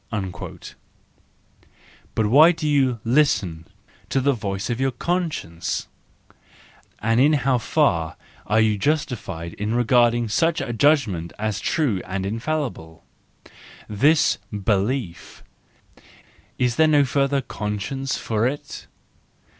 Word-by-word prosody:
"—But 110 - +1
why 145 +10 +7
do 160 -2 -4
you 135 -5 +2
listen 115 - +1 0.4
to 135 - +1
the 140 +2 +2
voice 100 -4 -4
of 120 +2 -2
your 135 - +2
conscience? 150 - -3 1.1
And 115 +2 +1
in 145 +4 +5
how 135 -3 +2
far 85 - +1 0.3
are 110 +3 +3
you 110 -2 +2
justified 115 - -2
in 105 +3 -1
regarding 120 -1 +3
such 165 +10 +1
a 135 -3 -3
judgment 115 - +1
as 110 -1 -2
true 125 - 0
and 95 +1 -4
infallible? 115 - -4 0.8
This 145 +9 +3
belief— 100 0 -2 1.1
is 125 -1 0
there 160 - +5
no 145 -2 +4
further 140 +1 +1
conscience 115 +4 -4
for 110 +1 0
it? 145 +3 -6
120 Hz, 110 wpm, -22 LUFS, 105-140 Hz, 1.1 s, why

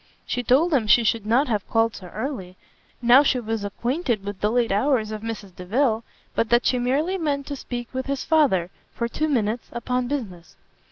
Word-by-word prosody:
She 245 - -2
told 280 +8 +3
him 240 -6 +2
she 235 +3 +6
should 220 -1 0
not 255 +6 +3
have 210 -4 -2
called 225 -1 +2
so 185 - -9
early, 195 -3 -5 0.5
now 245 +3 +8
she 270 -3 +2
was 225 -2 -3
acquainted 235 - -2
with 200 -1 -6
the 210 - +2
late 240 -2 +1
hours 220 +1 +1
of 215 -1 -5
Mrs 210 -5 -6
Delvile, 225 +5 0 0.3
but 230 - 0
that 240 0 +3
she 250 - +2
merely 295 +10 0
meant 285 -4 -1
to 285 - -5
speak 240 -3 -6
with 260 +1 -3
his 275 -1 -2
Father, 240 - +3 0.2
for 235 - -1
two 310 +6 -1
minutes, 230 -3 -1
upon 250 +1 -2
business. 205 -12 -5
235 Hz, 200 wpm, -24 LUFS, 215-270 Hz, 0.5 s, now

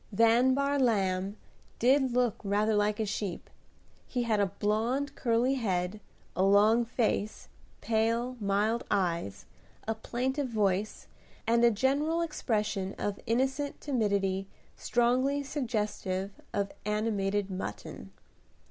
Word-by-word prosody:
Van 230 +5 +4
Bahr 280 +1 +1
Lamb 195 -5 +1 0.4
did 260 +2 +3
look 245 -2 +2
rather 210 +2 +1
like 210 0 +1
a 220 - +1
sheep. 200 -3 -4 0.6
He 245 -1 -1
had 220 -3 +1
a 200 - +3
blond 220 +8 -1
curly 240 +2 +1
head, 185 -1 -1 0.4
a - - 0
long 210 +4 +5
face, 225 -3 -1 0.3
pale, 230 +3 0
mild 210 +3 +1
eyes, 170 - -1 0.4
a 220 - +1
plaintive 260 +5 -2
voice, 205 -2 0 0.4
and 235 +1 +3
a 235 - +7
general 285 +9 +1
expression 210 - -2
of 205 -1 -3
innocent 265 +4 0
timidity 200 -7 0 0.3
strongly 255 +4 +1
suggestive 210 -8 -2 0.2
of 200 -1 -1
animated 205 -2 -1
mutton. 185 +1 -6
220 Hz, 115 wpm, -30 LUFS, 200-250 Hz, 0.6 s, a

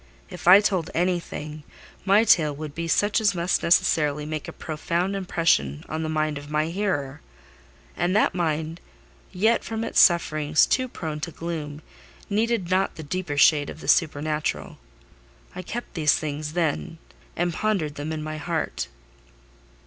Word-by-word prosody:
If - - -8
I 190 +3 +9
told 185 -5 0
anything, 170 -4 -2 0.4
my 200 +3 +5
tale 155 -9 +4
would 150 0 -7
be 170 +1 -4
such 205 +6 +2
as 205 -3 +2
must 175 +1 0
necessarily 150 -3 +2
make 155 -1 -5
a - - -5
profound 170 +4 -2
impression 165 - 0
on 155 +1 -3
the 160 - -3
mind 155 -1 -1
of 145 0 -12
my 155 +1 0
hearer: 165 -7 -2 0.7
and 175 +3 0
that 215 - +3
mind, 160 -1 -2 0.5
yet 220 +5 +2
from 225 0 -4
its 230 - +1
sufferings 155 -4 +4
too 255 -1 +1
prone 160 -10 -5
to 165 - -4
gloom, 155 -3 -6 0.5
needed 215 -3 0
not 190 +1 +1
the 160 - -8
deeper 155 -1 -4
shade 145 0 +4
of - - -9
the - - -10
supernatural. 155 -2 0 0.8
I - - -5
kept 235 +7 -6
these 155 -5 +3
things 150 0 -4
then, 165 0 -1 0.4
and 175 0 -1
pondered 190 -7 -1
them 145 +1 -5
in 155 -1 -4
my 155 0 -5
heart. 165 +1 -3
165 Hz, 155 wpm, -24 LUFS, 150-185 Hz, 0.8 s, I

